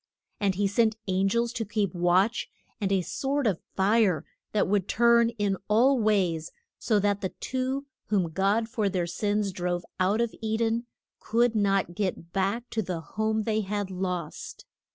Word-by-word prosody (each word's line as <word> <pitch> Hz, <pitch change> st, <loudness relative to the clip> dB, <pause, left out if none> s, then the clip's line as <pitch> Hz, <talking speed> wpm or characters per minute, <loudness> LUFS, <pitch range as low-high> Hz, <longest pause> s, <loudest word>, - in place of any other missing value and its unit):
And 195 Hz, -2 st, +1 dB
he 205 Hz, +2 st, +1 dB
sent 220 Hz, +2 st, +2 dB
an 190 Hz, +1 st, +2 dB
gels 235 Hz, +3 st, 0 dB
to 235 Hz, -, -2 dB
keep 210 Hz, -2 st, -1 dB
watch, 180 Hz, +5 st, +2 dB, 0.3 s
and 200 Hz, -3 st, -1 dB
a 195 Hz, -1 st, +3 dB
sword 275 Hz, -, -1 dB
of 195 Hz, -7 st, +1 dB, 0.2 s
fire 195 Hz, -5 st, +3 dB, 0.3 s
that 210 Hz, -, +1 dB
would 200 Hz, -1 st, +1 dB
turn 235 Hz, 0 st, +4 dB
in 200 Hz, -2 st, 0 dB
all 245 Hz, +5 st, +4 dB
ways, 185 Hz, -7 st, +1 dB, 0.3 s
so 220 Hz, -, +2 dB
that 205 Hz, 0 st, +1 dB
the 190 Hz, -, -1 dB
two 260 Hz, +2 st, -2 dB, 0.2 s
whom 190 Hz, -6 st, +1 dB
God 200 Hz, +6 st, +1 dB
for 220 Hz, -4 st, 0 dB
their 180 Hz, -2 st, -1 dB
sins 205 Hz, +3 st, -1 dB
drove 175 Hz, -1 st, -2 dB
out 190 Hz, +4 st, +2 dB
of 235 Hz, -1 st, 0 dB
E 220 Hz, 0 st, -1 dB
den 230 Hz, +1 st, 0 dB, 0.3 s
could 235 Hz, +1 st, +2 dB
not 195 Hz, -4 st, +1 dB
get 175 Hz, -3 st, -3 dB
back 200 Hz, +5 st, 0 dB
to 225 Hz, -, 0 dB
the 180 Hz, -4 st, -3 dB
home 220 Hz, +4 st, -1 dB
they 220 Hz, 0 st, 0 dB
had 205 Hz, -1 st, -3 dB
lost. 180 Hz, -3 st, -4 dB
205 Hz, 175 wpm, -27 LUFS, 190-225 Hz, 0.3 s, turn